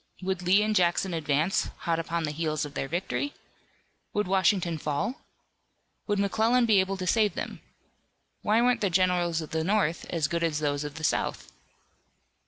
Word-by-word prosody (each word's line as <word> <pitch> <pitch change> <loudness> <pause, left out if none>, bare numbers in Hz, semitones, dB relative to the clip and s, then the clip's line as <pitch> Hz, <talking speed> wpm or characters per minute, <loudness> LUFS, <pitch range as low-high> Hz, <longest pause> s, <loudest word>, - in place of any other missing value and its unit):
Would 190 -1 -1
Lee 190 +4 +4
and 215 0 0
Jackson 180 0 +2
advance, 155 +3 0
hot 165 -2 0
upon 165 0 -2
the 150 - -1
heels 155 -1 -1
of 145 - -9
their 135 - -3
victory? 195 - -2 0.8
Would 210 0 +1
Washington 185 -3 +2
fall? 150 - -2 0.9
Would 205 -1 +1
McClellan 220 +5 +2
be 215 -4 +5
able 190 +1 0
to 185 - -4
save 210 +2 +2
them? - - -5 0.8
Why 220 +3 +3
weren't 245 -1 +2
the 200 - +2
generals 175 -2 +2
of 155 - -8
the 160 0 -1
North 190 -3 0
as 160 -4 0
good 170 0 -2
as 160 -3 0
those 145 -1 -1
of 145 -1 -6
the 160 - -8
South? - - -1
175 Hz, 175 wpm, -27 LUFS, 160-205 Hz, 0.9 s, be